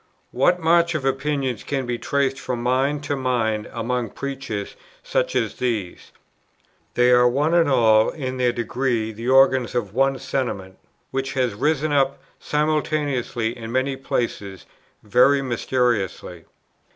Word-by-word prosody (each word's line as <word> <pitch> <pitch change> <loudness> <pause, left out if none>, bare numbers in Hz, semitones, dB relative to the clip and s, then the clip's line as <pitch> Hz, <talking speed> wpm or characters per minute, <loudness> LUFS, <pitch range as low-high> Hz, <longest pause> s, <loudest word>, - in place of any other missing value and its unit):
What 175 +8 +2
march 170 0 +3
of 145 -4 -2
opinions 135 -3 -1
can 135 -2 -2
be 120 -1 -3
traced 135 -1 0
from 120 -2 -4
mind 135 +4 +1
to 145 0 -2
mind 115 -5 -1
among 120 0 -2
preachers 130 -7 -5 0.3
such - - -1
as - - -1
these? 110 -8 -3 0.8
They 125 0 +4
are 125 0 +5
one 145 +6 +1
and 170 -3 +4
all 110 -4 +4
in 130 -4 -5
their 125 -1 +2
degree 120 -1 -1
the 115 +3 -5
organs 130 -2 +4
of 105 -5 -2
one 135 +2 +2
Sentiment, 120 -8 -4 0.3
which 135 0 -2
has 130 -4 0
risen 150 +7 0
up 135 -1 +2 0.2
simultaneously 150 -6 -1
in 115 -2 -7
many 130 +2 0
places 110 -7 -3 0.4
very 135 +6 +4
mysteriously." 120 -8 -1
130 Hz, 140 wpm, -22 LUFS, 120-140 Hz, 0.8 s, are